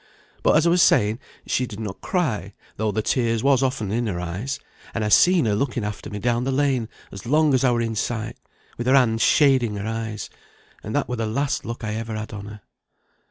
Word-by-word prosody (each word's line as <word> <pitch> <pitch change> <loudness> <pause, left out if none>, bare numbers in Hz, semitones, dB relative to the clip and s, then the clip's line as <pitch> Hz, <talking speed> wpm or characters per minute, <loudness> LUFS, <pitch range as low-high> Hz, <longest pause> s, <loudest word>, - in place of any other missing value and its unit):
But, - - +4
as 160 - +3
I 170 - +4
was 175 0 +4
saying, 105 -4 +4 0.3
she 125 - 0
did 105 - -9
not 105 -4 -6
cry, 115 - -1 0.2
though 110 -1 0
the 110 +1 -1
tears 115 -2 0
was 135 -2 +4
often 130 -7 -1
in 120 +2 0
her 90 -4 -2
eyes; 95 +10 -4 0.4
and 115 -2 0
I - - 0
seen 175 - +5
her 105 - +2
looking 120 +1 -1
after 105 0 -5
me 105 - -5
down 120 +2 0
the 135 - -1
lane 130 -4 +1 0.2
as 95 +3 -9
long 150 +2 +3
as 130 - +2
I 130 - +5
were 120 -1 +1
in 115 -1 -1
sight, 110 +1 -3 0.4
with 120 - -2
her 130 - +5
hand 115 -4 +3
shading 130 -7 +4
her 100 0 -4
eyes 110 -1 -4 0.5
and 110 - -5
that 145 - +1
were 125 - -3
the 110 -1 -1
last 140 +6 -1
look 115 +1 -6
I 110 -1 -2
ever 110 0 -4
had 110 0 -6
on 100 -1 -7
her." 105 0 -10
115 Hz, 230 wpm, -23 LUFS, 105-130 Hz, 0.5 s, seen